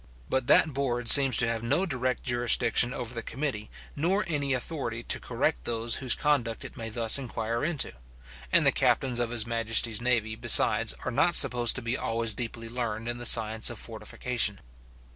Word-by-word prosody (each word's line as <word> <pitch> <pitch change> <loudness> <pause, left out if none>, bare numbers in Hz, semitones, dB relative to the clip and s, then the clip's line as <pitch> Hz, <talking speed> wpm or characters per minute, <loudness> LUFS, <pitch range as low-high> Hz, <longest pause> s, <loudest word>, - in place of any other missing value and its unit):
But 130 -2 -1
that 155 - +4
board 125 -3 -3
seems 135 +1 +8
to 115 - +2
have 115 -1 -2
no 140 +11 0
direct 130 -6 -3
jurisdiction 120 0 +1
over 125 -2 -6
the 115 - -5
committee, 120 -6 -5 0.3
nor 190 +7 -1
any 145 -4 -2
authority 125 -3 -3
to - - 0
correct - - -3
those 115 0 -1
whose 130 -3 +2
conduct 125 -7 -2
it - - -10
may 115 -2 -6
thus 115 +3 +2
inquire 115 -3 -4
into; 155 -2 -1 0.6
and - - +3
the - - +6
captains 125 -3 0
of 120 -1 -1
his 115 -2 -3
majesty's 115 -1 0
navy, 115 -3 -1
besides, - - +3
are - - -2
not - - +1
supposed 120 -1 +3
to - - -5
be 115 +2 -2
always 115 -1 -1
deeply 115 +1 -6
learned 115 -2 -5
in 120 0 -4
the 120 - 0
science 110 -1 +4
of - - -8
fortification. - - -3
120 Hz, 180 wpm, -27 LUFS, 115-130 Hz, 0.6 s, seems